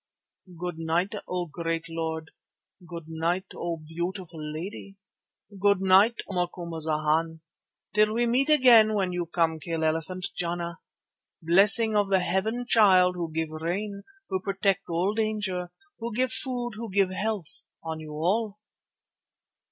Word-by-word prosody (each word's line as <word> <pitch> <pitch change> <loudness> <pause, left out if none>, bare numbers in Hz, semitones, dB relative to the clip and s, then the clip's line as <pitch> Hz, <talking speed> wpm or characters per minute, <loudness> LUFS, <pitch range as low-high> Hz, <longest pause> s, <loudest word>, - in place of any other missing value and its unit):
Good 175 -2 -4
night, 170 +5 0
O 180 -1 -2
great 165 0 -3
Lord. 160 -1 -4 0.6
Good 170 -2 -8
night, 165 +3 -1
O 170 -1 -3
beautiful 170 +1 -6
lady. 175 +6 -7 0.7
Good 200 -1 +4
night, 195 +5 +5
O - - -7
Macumazana, 160 -2 -1 0.5
till 215 0 +4
we 235 +2 +1
meet 255 +5 +2
again 240 -7 +6
when 190 -3 0
you 175 -1 -3
come 165 -1 0
kill 165 +1 -3
elephant 165 +3 -1
Jana. 170 -1 -3 0.6
Blessing 200 +6 +5
of 205 -1 +2
the 190 -1 +3
Heaven 205 +7 -1
Child, 185 -6 +5
who 170 -2 -4
give 160 0 -2
rain, 190 +6 -3 0.3
who 190 - -1
protect 195 0 0
all 175 +4 0
danger, 205 -5 -2 0.3
who 235 +1 -4
give 255 0 +1
food, 245 0 -2
who 230 0 -6
give 195 -1 +2
health, 205 -3 -4 0.2
on 160 -1 -5
you 155 -1 -9
all." 200 +7 -1
180 Hz, 135 wpm, -27 LUFS, 165-205 Hz, 0.7 s, again